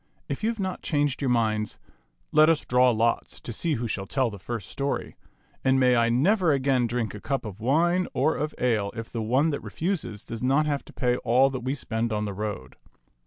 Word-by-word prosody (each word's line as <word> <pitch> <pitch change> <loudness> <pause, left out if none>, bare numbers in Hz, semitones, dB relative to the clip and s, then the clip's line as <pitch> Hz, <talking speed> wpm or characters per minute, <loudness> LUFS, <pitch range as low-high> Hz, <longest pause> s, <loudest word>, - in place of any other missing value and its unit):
If - - -4
you 220 - +2
have 230 -2 -4
not 190 -2 -3
changed 145 -3 0
your 135 - +1
minds, 110 -3 0 0.5
let 155 +1 +6
us 165 -2 +2
draw 125 +1 +4
lots 115 0 0
to 120 - -7
see 160 +7 0
who 120 0 -2
shall 100 -2 -3
tell 130 -1 0
the 100 - -9
first 100 +1 -5
story; 140 0 -3 0.5
and 130 0 +3
may 125 -1 +4
I 115 0 +3
never 170 - +3
again 135 -3 +2
drink 115 -3 -2
a 105 - -8
cup 135 -4 -2
of 105 -1 -7
wine 170 +9 +2
or 160 - +1
of 150 +1 -3
ale 110 -5 +1
if 115 0 -6
the 115 - -3
one 130 +8 +2
that 145 - -3
refuses 160 - -3
does 115 - -6
not 135 +4 +3
have 145 -2 -1
to - - -13
pay 125 -1 +1
all 130 +4 +3
that 130 - -3
we 130 +3 -2
spend 115 -3 -2
on 105 0 -1
the 100 - -4
road. 100 -10 -5
125 Hz, 220 wpm, -26 LUFS, 115-145 Hz, 0.5 s, let